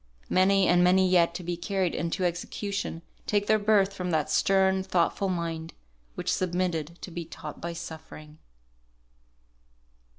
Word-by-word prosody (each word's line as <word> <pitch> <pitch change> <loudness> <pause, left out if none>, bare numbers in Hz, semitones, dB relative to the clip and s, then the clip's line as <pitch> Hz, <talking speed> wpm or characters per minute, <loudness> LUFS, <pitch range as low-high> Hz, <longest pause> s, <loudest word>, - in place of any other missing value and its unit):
Many 190 +1 +4
and 175 0 +4
many 185 +1 +5
yet 170 -2 +3
to 180 - -5
be 175 +1 -2
carried 185 +1 -1
into 170 +2 -1
execution, 180 0 -3 0.2
take 205 -1 +1
their 215 +1 +3
birth 205 -2 +3
from 180 -2 -4
that 155 -3 0
stern, 190 -1 +3
thoughtful 190 +1 0
mind, 165 -2 -3 0.4
which - - -1
submitted 175 -3 -1
to 185 - -7
be 170 0 -4
taught 155 -2 -9
by 170 0 -4
suffering. 155 -2 -9
180 Hz, 140 wpm, -27 LUFS, 170-190 Hz, 0.4 s, many